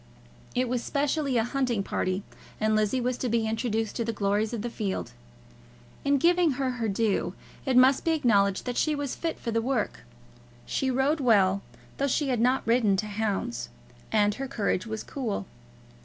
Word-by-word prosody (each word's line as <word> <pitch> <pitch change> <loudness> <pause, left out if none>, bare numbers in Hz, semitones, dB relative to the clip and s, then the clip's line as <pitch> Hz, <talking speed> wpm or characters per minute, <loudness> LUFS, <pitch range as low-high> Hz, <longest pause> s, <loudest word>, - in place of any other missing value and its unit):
It 250 +1 +1
was 240 -1 -1
specially 285 -2 0
a 225 - +3
hunting 245 -4 0
party, 185 0 -1 0.4
and 215 0 +2
Lizzie 215 +4 +2
was 250 0 -1
to 250 - -1
be 225 -1 +1
introduced 225 -1 -1
to 235 - 0
the 230 - -1
glories 205 +1 0
of 230 -3 -4
the 240 - -2
field. 200 -4 -3 0.9
In 280 0 +3
giving 345 +1 +4
her 260 0 -1
her 235 -3 -2
due, 205 0 0 0.3
it 260 -1 +3
must 260 +1 +6
be - - +2
acknowledged 200 -10 +2
that 245 -1 -3
she 310 -1 +2
was 285 -2 -3
fit 330 -1 -3
for 230 - -4
the 230 0 +1
work. 250 -2 -1 0.7
She 265 - -1
rode 265 +5 +2
well, 200 -7 +4 0.4
though 280 - +1
she 280 +1 0
had 245 -3 +1
not 255 +2 +2
ridden 225 -4 +3
to 215 - -1
hounds, 200 - -2 0.4
and 210 -1 +3
her 270 - -2
courage 215 -4 -1
was 220 0 -4
cool. 230 -8 -3
235 Hz, 185 wpm, -27 LUFS, 215-265 Hz, 0.9 s, must